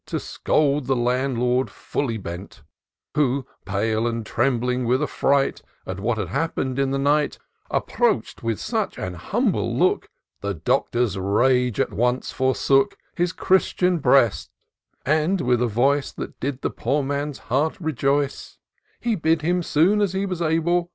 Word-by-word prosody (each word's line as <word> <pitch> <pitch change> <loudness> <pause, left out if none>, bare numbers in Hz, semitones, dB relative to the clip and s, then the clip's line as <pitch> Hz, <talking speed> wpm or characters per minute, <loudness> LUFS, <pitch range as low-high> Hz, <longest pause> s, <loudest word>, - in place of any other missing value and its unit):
To - - -2
scold 145 -3 0
the 135 - +2
Landlord 125 0 +1
fiilly 115 -6 -3
bent; 90 +1 -8 0.5
Who, 140 -3 +1 0.2
pale, 110 +3 0
and 115 -1 -3
trembling 125 +1 0
with 130 +5 +2
affright 140 -1 +1 0.2
At 95 0 -5
what 110 +3 0
had 100 -6 -3
happened 135 - -1
in 135 -1 +2
the 135 - 0
liight, 145 +2 +1 0.3
Approach'd - - 0
with 115 -3 -2
such - - -2
an 95 - -4
humble 90 - -1
look. - - +2 0.3
The 100 -1 -3
Doctor*i3 105 - 0
rage 125 -3 +3
at - - 0
once 125 +2 0
forsook 135 +1 +2 0.2
His 175 0 +1
Christian 185 -1 +2
breast; 135 -7 +3 0.6
and, 155 +6 +2
with 125 -5 +1
a 125 - +2
voice 135 +6 +1
That - - -8
did 140 0 -3
the - - 0
poor 145 0 -1
man's 145 +1 -2
heart 145 - -1
rejoice, 140 -3 -1 0.4
He 235 - 0
bid 160 -4 +1
him, 175 +2 +1
soon 175 +6 +3
as 200 -3 +1
he 190 +1 0
was 185 -3 -4
able. 170 +2 +1
135 Hz, 150 wpm, -23 LUFS, 120-150 Hz, 0.6 s, rage